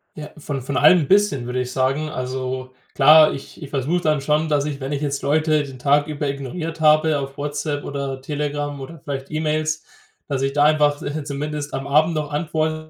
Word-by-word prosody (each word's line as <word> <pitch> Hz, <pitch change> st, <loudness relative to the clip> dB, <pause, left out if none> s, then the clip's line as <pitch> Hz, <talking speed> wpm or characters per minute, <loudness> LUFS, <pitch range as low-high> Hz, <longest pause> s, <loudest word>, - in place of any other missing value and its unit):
Ja, 150 Hz, -1 st, -8 dB
von 145 Hz, -3 st, -4 dB
von 135 Hz, +2 st, -4 dB
allem 155 Hz, +5 st, +6 dB
'n 140 Hz, -, -3 dB
bisschen, 195 Hz, -11 st, +3 dB
würde 125 Hz, +1 st, -2 dB
ich 125 Hz, 0 st, -4 dB
sagen. 135 Hz, +4 st, 0 dB
Also 130 Hz, -1 st, -4 dB, 0.2 s
klar, 155 Hz, +2 st, +7 dB
ich 135 Hz, -, -10 dB
ich 145 Hz, -, -7 dB
versuche 150 Hz, +6 st, -1 dB
dann 155 Hz, -3 st, +1 dB
schon, 150 Hz, +2 st, +1 dB
dass 145 Hz, -1 st, +1 dB
ich, 145 Hz, -2 st, -4 dB
wenn 135 Hz, +1 st, -5 dB
ich 145 Hz, 0 st, -2 dB
jetzt 140 Hz, -1 st, -2 dB
Leute 155 Hz, 0 st, +2 dB
den 135 Hz, -2 st, -9 dB
Tag 145 Hz, +2 st, +3 dB
über 150 Hz, -1 st, -3 dB
ignoriert 160 Hz, +4 st, -5 dB
habe 155 Hz, 0 st, +4 dB
auf 135 Hz, 0 st, -6 dB
WhatsApp 145 Hz, 0 st, -3 dB
oder 140 Hz, -1 st, -4 dB
Telegram 145 Hz, 0 st, -3 dB
oder 165 Hz, +4 st, -9 dB
vielleicht 135 Hz, -1 st, -5 dB
E-Mails, 155 Hz, 0 st, -1 dB, 0.4 s
dass 140 Hz, -3 st, -2 dB
ich 135 Hz, 0 st, 0 dB
da 145 Hz, -, +3 dB
einfach, 150 Hz, -1 st, +3 dB
äh, 145 Hz, +1 st, -3 dB
zumindest 145 Hz, +1 st, -4 dB
am 135 Hz, 0 st, -4 dB
Abend 155 Hz, +3 st, +3 dB
noch 150 Hz, -1 st, -3 dB
antworte, 155 Hz, 0 st, -2 dB
145 Hz, 205 wpm, -21 LUFS, 140-155 Hz, 0.4 s, klar